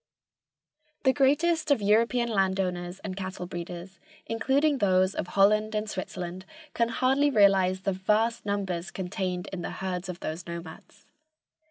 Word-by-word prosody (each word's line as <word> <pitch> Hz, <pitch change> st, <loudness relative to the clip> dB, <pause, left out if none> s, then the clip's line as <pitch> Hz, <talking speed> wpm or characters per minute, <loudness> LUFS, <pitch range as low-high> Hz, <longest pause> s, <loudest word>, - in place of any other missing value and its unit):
The 265 Hz, -2 st, +4 dB
greatest 305 Hz, +4 st, +2 dB
of 285 Hz, -, +4 dB
European 230 Hz, +4 st, +2 dB
landowners 190 Hz, -4 st, -1 dB
and 190 Hz, -3 st, -4 dB
cattle 185 Hz, -2 st, -5 dB
breeders, 175 Hz, +1 st, -7 dB, 0.3 s
including 275 Hz, +5 st, +1 dB
those 185 Hz, -2 st, +3 dB
of -, -, -3 dB
Holland 215 Hz, +3 st, +3 dB
and 210 Hz, 0 st, -1 dB
Switzerland, 185 Hz, -2 st, -5 dB, 0.3 s
can 235 Hz, 0 st, +1 dB
hardly 265 Hz, +5 st, +2 dB
realize 195 Hz, -5 st, +4 dB
the 195 Hz, 0 st, 0 dB
vast 215 Hz, +5 st, +1 dB
numbers 190 Hz, -4 st, -2 dB
contained 185 Hz, -1 st, -3 dB
in 185 Hz, -, -4 dB
the -, -, -4 dB
herds 185 Hz, -1 st, -4 dB
of 180 Hz, -, -6 dB
those 160 Hz, +3 st, -5 dB
nomads. 170 Hz, -1 st, -9 dB
195 Hz, 140 wpm, -27 LUFS, 180-225 Hz, 0.3 s, The